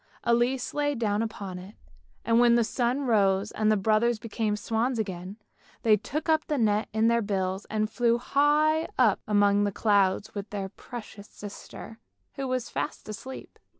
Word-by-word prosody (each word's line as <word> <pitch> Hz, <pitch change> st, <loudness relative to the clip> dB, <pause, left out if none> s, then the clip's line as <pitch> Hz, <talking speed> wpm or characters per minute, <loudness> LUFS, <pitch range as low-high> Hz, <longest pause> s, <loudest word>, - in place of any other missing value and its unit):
Elise 240 Hz, +2 st, +1 dB
lay 290 Hz, -1 st, 0 dB
down 215 Hz, -3 st, 0 dB
upon 200 Hz, -5 st, -5 dB
it, 190 Hz, +4 st, -12 dB, 0.5 s
and 230 Hz, +1 st, +3 dB
when 240 Hz, -1 st, +5 dB
the 235 Hz, -, +4 dB
sun 245 Hz, +4 st, 0 dB
rose 205 Hz, -5 st, +2 dB
and 215 Hz, 0 st, +1 dB
the 215 Hz, -, +3 dB
brothers 220 Hz, +4 st, +2 dB
became 215 Hz, -1 st, -2 dB
swans 230 Hz, +4 st, -1 dB
again, 190 Hz, -2 st, -4 dB, 0.5 s
they 220 Hz, -2 st, +6 dB
took 295 Hz, -, -4 dB
up 315 Hz, -1 st, +3 dB
the 300 Hz, -, 0 dB
net 215 Hz, -2 st, +1 dB
in 220 Hz, +1 st, +2 dB
their 235 Hz, 0 st, +3 dB
bills 190 Hz, -2 st, -2 dB
and 215 Hz, 0 st, -1 dB
flew 235 Hz, +2 st, +1 dB
high 300 Hz, +5 st, +2 dB
up 225 Hz, -6 st, +4 dB
among 205 Hz, -1 st, +3 dB
the 205 Hz, -, 0 dB
clouds 200 Hz, -1 st, +1 dB
with 200 Hz, 0 st, -6 dB
their 195 Hz, -2 st, -4 dB
precious 215 Hz, -2 st, -10 dB
sister, 210 Hz, +2 st, -10 dB, 0.3 s
who 275 Hz, -2 st, -4 dB
was 255 Hz, -1 st, -2 dB
fast -, -, -4 dB
asleep. 260 Hz, +5 st, -9 dB
220 Hz, 170 wpm, -27 LUFS, 205-245 Hz, 0.5 s, they